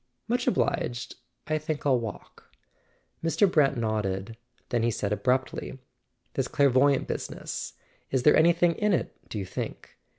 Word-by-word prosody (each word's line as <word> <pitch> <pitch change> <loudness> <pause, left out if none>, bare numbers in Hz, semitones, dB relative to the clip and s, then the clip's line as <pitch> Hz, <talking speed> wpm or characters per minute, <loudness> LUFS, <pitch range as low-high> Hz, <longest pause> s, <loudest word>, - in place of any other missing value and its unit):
"Much 245 +1 0
obliged; 120 -1 0 0.3
I 155 0 0
think 155 -1 -4
I'll 130 -3 +4
walk." 110 -5 -8 0.7
Mr. 165 +5 +3
Brant 145 -6 +3
nodded; 110 -2 -2 0.3
then 120 - +1
he 115 - +2
said 105 -2 -1
abruptly: 125 +6 -1 0.6
"This - - -1
clairvoyante 140 0 +3
business: - - -5 0.4
is 130 -2 0
there 150 - +6
anything 170 +1 +4
in 210 +3 +1
it, - - -1
do - - -5
you 100 - -3
think? 95 - -7
130 Hz, 140 wpm, -27 LUFS, 115-155 Hz, 0.7 s, there